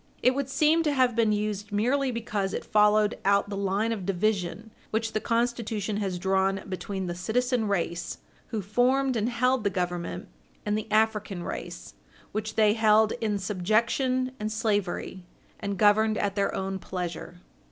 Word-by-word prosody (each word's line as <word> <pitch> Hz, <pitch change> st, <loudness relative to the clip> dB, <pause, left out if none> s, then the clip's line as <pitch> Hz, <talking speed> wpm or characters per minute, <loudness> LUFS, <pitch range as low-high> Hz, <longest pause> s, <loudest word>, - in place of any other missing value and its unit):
It 255 Hz, -, +5 dB
would 275 Hz, 0 st, -2 dB
seem 310 Hz, +4 st, +3 dB
to 305 Hz, -2 st, +1 dB
have 255 Hz, -3 st, +2 dB
been 225 Hz, -2 st, +3 dB
used 210 Hz, 0 st, -2 dB
merely 255 Hz, +7 st, +1 dB
because 215 Hz, -5 st, -2 dB
it -, -, -4 dB
followed 210 Hz, 0 st, +3 dB
out 200 Hz, 0 st, +3 dB
the -, -, -2 dB
line 200 Hz, +3 st, 0 dB
of 215 Hz, -4 st, -3 dB
division 195 Hz, +2 st, -1 dB, 0.2 s
which 225 Hz, 0 st, -1 dB
the 215 Hz, -, +1 dB
Constitution 230 Hz, -3 st, -1 dB
has 195 Hz, -3 st, -2 dB
drawn 190 Hz, +1 st, +1 dB
between 190 Hz, 0 st, -4 dB
the 175 Hz, -, -3 dB
citizen 225 Hz, +6 st, 0 dB
race, 170 Hz, -3 st, -2 dB, 0.3 s
who 215 Hz, -3 st, -3 dB
formed 255 Hz, +6 st, +2 dB
and 225 Hz, +1 st, 0 dB
held 250 Hz, 0 st, +1 dB
the 200 Hz, -, +2 dB
Government, 175 Hz, -2 st, -3 dB, 0.4 s
and 210 Hz, 0 st, +1 dB
the 215 Hz, 0 st, -4 dB
African 210 Hz, -4 st, +1 dB
race, -, -, -6 dB, 0.4 s
which 215 Hz, 0 st, -4 dB
they 215 Hz, -1 st, +4 dB
held 220 Hz, 0 st, +4 dB
in 210 Hz, -2 st, 0 dB
subjection 230 Hz, +7 st, +1 dB
and 215 Hz, 0 st, -3 dB
slavery 205 Hz, -4 st, -1 dB, 0.4 s
and 200 Hz, -1 st, -3 dB
governed 215 Hz, +2 st, +4 dB
at 200 Hz, -1 st, 0 dB
their 200 Hz, 0 st, 0 dB
own 190 Hz, 0 st, -3 dB
pleasure. 175 Hz, -1 st, -5 dB
210 Hz, 165 wpm, -27 LUFS, 195-230 Hz, 0.4 s, It